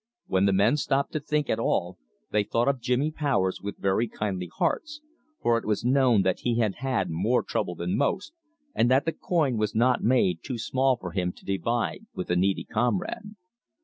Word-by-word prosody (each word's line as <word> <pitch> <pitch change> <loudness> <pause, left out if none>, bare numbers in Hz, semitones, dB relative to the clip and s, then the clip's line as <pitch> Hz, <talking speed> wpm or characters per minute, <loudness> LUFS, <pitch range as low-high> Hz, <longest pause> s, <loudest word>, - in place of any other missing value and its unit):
When 95 +1 +2
the 100 - +4
men 100 +9 +3
stopped 140 -1 0
to 155 - 0
think 150 0 -1
at 110 - 0
all, 90 -5 -1 0.3
they 105 -1 +2
thought 115 +4 0
of 135 -3 +1
Jimmy 125 +5 +1
Powers 135 -12 0
with 100 0 -5
very 100 +4 +1
kindly 95 -5 -4
hearts, 300 - -1 0.4
for 115 -1 +3
it - - -13
was 105 +1 -1
known 125 -5 +4
that 95 -1 0
he 120 -1 0
had 110 -5 0
had 130 -7 -1
more 105 +10 +1
trouble 90 - -2
than 85 +3 -2
most, 185 - -1 0.4
and 120 - +2
that 130 +2 +3
the 165 - +1
coin 150 -9 0
was 105 -1 -1
not 125 +3 +3
made 105 -9 +3
too 130 -3 -5
small 130 +3 +1
for 90 -5 -7
him 90 -1 -1
to - - -19
divide 115 - -2
with 90 - -4
a - - +3
needy 95 +2 +1
comrade. 125 - -2
115 Hz, 200 wpm, -26 LUFS, 95-135 Hz, 0.4 s, the